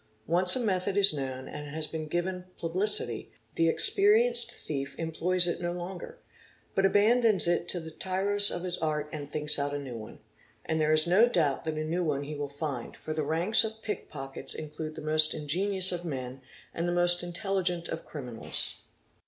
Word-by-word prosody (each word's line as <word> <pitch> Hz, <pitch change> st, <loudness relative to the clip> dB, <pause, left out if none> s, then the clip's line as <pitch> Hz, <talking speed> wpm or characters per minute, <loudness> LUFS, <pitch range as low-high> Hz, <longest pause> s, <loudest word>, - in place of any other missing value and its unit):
Once 180 Hz, +2 st, +5 dB
a -, -, 0 dB
method 195 Hz, -3 st, 0 dB
is 200 Hz, -4 st, +7 dB
known 130 Hz, -2 st, -4 dB
and 150 Hz, 0 st, -7 dB
has 155 Hz, +2 st, -3 dB
been 155 Hz, 0 st, -5 dB
given 180 Hz, +3 st, -2 dB
publi 180 Hz, +5 st, 0 dB
city, 120 Hz, -, -1 dB, 0.2 s
the 165 Hz, 0 st, +2 dB
experienced 420 Hz, -, +4 dB
thief 140 Hz, -2 st, -5 dB
employs 175 Hz, +2 st, +2 dB
it 175 Hz, -, -2 dB
no 175 Hz, 0 st, -1 dB
longer, 180 Hz, -, -7 dB, 0.6 s
but 195 Hz, 0 st, +3 dB
abandons 215 Hz, 0 st, +3 dB
it 175 Hz, 0 st, +1 dB
to 175 Hz, -, -1 dB
the 160 Hz, -1 st, -8 dB
tiros 195 Hz, +4 st, 0 dB
of 175 Hz, -, -4 dB
his 180 Hz, -1 st, -2 dB
art 150 Hz, -2 st, -1 dB
and 145 Hz, -2 st, -6 dB
thinks 150 Hz, 0 st, +2 dB
out 145 Hz, 0 st, -1 dB
a -, -, -1 dB
new 135 Hz, -4 st, -7 dB
one. 110 Hz, -1 st, -9 dB, 0.5 s
And 160 Hz, 0 st, 0 dB
there 155 Hz, 0 st, +2 dB
is 155 Hz, 0 st, +5 dB
no 200 Hz, +8 st, +5 dB
doubt 155 Hz, -, +1 dB
that 160 Hz, -1 st, -2 dB
a 155 Hz, -, -2 dB
new 170 Hz, +3 st, -1 dB
one 145 Hz, -3 st, -1 dB
he 150 Hz, +2 st, -6 dB
will 145 Hz, -1 st, -4 dB
find, 140 Hz, -4 st, -5 dB
for 155 Hz, -, -5 dB
the 155 Hz, -, -1 dB
ranks 165 Hz, +10 st, +2 dB
of 220 Hz, 0 st, -6 dB
pickpockets 135 Hz, -10 st, -4 dB
include 155 Hz, 0 st, -6 dB
the -, -, -7 dB
most 155 Hz, 0 st, +3 dB
ingenious 185 Hz, +5 st, +1 dB
of 175 Hz, -1 st, -3 dB
men 130 Hz, -5 st, -5 dB, 0.3 s
and 170 Hz, +1 st, -2 dB
the -, -, 0 dB
most 175 Hz, 0 st, +4 dB
intelligent 175 Hz, -1 st, -2 dB
of -, -, -5 dB
criminals. 125 Hz, -6 st, -4 dB
165 Hz, 195 wpm, -29 LUFS, 150-185 Hz, 0.6 s, is